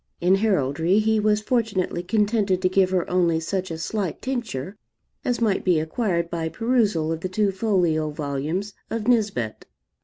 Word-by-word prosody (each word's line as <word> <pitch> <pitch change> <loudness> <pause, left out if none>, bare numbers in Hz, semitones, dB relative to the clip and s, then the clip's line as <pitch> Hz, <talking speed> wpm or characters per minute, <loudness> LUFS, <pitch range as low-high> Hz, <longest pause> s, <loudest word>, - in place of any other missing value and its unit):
In 180 +2 +3
heraldry 180 -4 +2
he 220 0 +3
was 210 0 +2
fortunately 215 -7 0
contented 205 -1 +1
to 185 - +4
give 185 0 +3
her 185 -2 0
only 175 -3 +2
such 185 +3 -3
a 165 - -4
slight 190 +1 -3
tincture 220 - -4 0.5
as 245 -1 0
might 220 -4 +1
be 180 -4 +3
acquired 170 +1 -1
by 165 -1 -3
perusal 210 -5 +1
of 165 - -2
the 185 - -4
two 200 +1 +1
folio 180 -7 +1
volumes 150 +7 -3 0.2
of 225 -1 -3
Nisbet. 205 - 0
185 Hz, 160 wpm, -24 LUFS, 165-215 Hz, 0.5 s, to